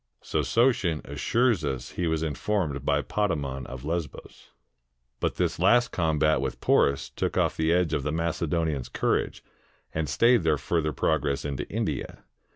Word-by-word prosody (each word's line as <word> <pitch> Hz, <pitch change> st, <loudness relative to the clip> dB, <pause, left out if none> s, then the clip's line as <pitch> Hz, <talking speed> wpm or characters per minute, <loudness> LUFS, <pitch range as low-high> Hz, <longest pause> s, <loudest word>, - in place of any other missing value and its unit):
So -, -, 0 dB
Sotion 115 Hz, -, +2 dB
assures 115 Hz, -7 st, +1 dB
us 65 Hz, -4 st, -3 dB
he 90 Hz, -, -2 dB
was 80 Hz, 0 st, 0 dB
informed 80 Hz, -1 st, -1 dB
by -, -, +1 dB
Potamon 70 Hz, -11 st, -2 dB
of 65 Hz, +1 st, -8 dB
Lesbos. 85 Hz, -1 st, -5 dB, 0.7 s
But -, -, -1 dB
this -, -, -1 dB
last 120 Hz, 0 st, +4 dB
combat 80 Hz, -4 st, +2 dB
with 65 Hz, -1 st, -3 dB
Poms 70 Hz, -1 st, +2 dB
took -, -, -2 dB
off -, -, +2 dB
the 80 Hz, 0 st, +1 dB
edge 85 Hz, -2 st, +2 dB
of 75 Hz, -, +1 dB
the 75 Hz, +2 st, -2 dB
Macedonians' 80 Hz, -3 st, -1 dB
courage, -, -, -1 dB, 0.5 s
and 80 Hz, -2 st, -2 dB
stayed 120 Hz, -1 st, +4 dB
their 80 Hz, -2 st, +2 dB
further 75 Hz, +1 st, -1 dB
progress 75 Hz, -1 st, 0 dB
into 70 Hz, -2 st, -4 dB
India. -, -, -3 dB
80 Hz, 155 wpm, -27 LUFS, 70-85 Hz, 0.7 s, last